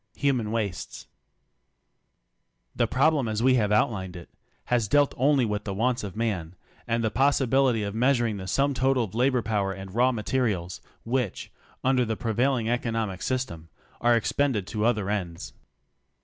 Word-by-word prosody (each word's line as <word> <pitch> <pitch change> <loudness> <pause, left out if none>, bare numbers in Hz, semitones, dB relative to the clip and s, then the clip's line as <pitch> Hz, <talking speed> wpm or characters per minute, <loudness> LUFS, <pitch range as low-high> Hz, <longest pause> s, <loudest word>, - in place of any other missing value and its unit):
HUMAN 130 -6 0
WASTES 105 -5 -4 1.7
The 120 - +2
problem 140 +1 +2
as 110 +1 -1
we 130 0 +5
have 105 -1 0
outlined 95 -4 0
it, 85 -1 -11 0.3
has 120 -4 +1
dealt 145 +6 +3
only 135 -1 +3
with 105 -1 -2
the 100 -2 -4
wants 120 +3 0
of 100 -2 -6
man, 95 -7 -2 0.3
and 115 0 0
the 110 - 0
possibility 135 -3 +2
of 100 -1 -3
measuring 120 -2 +1
the 95 -1 -7
sum 140 +8 +1
total 130 0 +2
of 100 - -7
labor 125 +1 +2
power 100 -3 0
and 95 0 -9
raw 125 +3 +3
materials, 105 -6 -2 0.2
which, 120 -4 -2 0.3
under 130 -1 +3
the 110 -2 -2
pre 115 -2 -2
vailing 125 0 +1
economic 115 -5 -2
system, 85 -11 -3 0.3
are 120 0 +4
expended 115 -2 0
to 105 +1 -2
other 110 -5 +1
ends. 90 -5 -4
115 Hz, 160 wpm, -26 LUFS, 105-130 Hz, 1.7 s, we